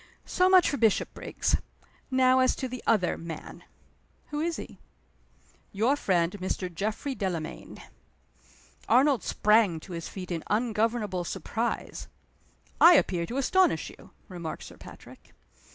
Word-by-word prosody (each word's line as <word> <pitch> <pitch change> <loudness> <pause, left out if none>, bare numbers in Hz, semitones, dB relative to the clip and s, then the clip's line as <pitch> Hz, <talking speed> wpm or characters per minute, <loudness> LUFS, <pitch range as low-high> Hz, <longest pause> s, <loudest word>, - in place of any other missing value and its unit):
So 365 0 +2
much 370 -2 +6
for 285 - -1
Bishopriggs. 225 -3 0 0.5
Now 260 0 +4
as 255 0 +3
to 260 - -4
the 255 -1 -7
other 205 -6 +2
man." 165 0 -8 0.7
"Who 295 - -3
is 335 +1 -1
he?" - - -9 0.9
"Your 225 +8 +2
friend, 175 -10 +1
Mr. 185 -1 -3
Geoffrey 215 - -3
Delamayn." 180 -9 -5 1.1
Arnold 260 0 +4
sprang 210 -6 +2
to 190 - -12
his 165 -1 -6
feet 185 -2 -8
in 165 -2 -2
ungovernable 215 -3 0
surprise. 220 +7 -4 0.7
"I 345 - +10
appear 175 - +1
to 245 - -5
astonish 370 +7 +2
you," - - -16 0.2
remarked 170 -4 -7
Sir - - -12
Patrick. - - -14
220 Hz, 130 wpm, -27 LUFS, 180-260 Hz, 1.1 s, I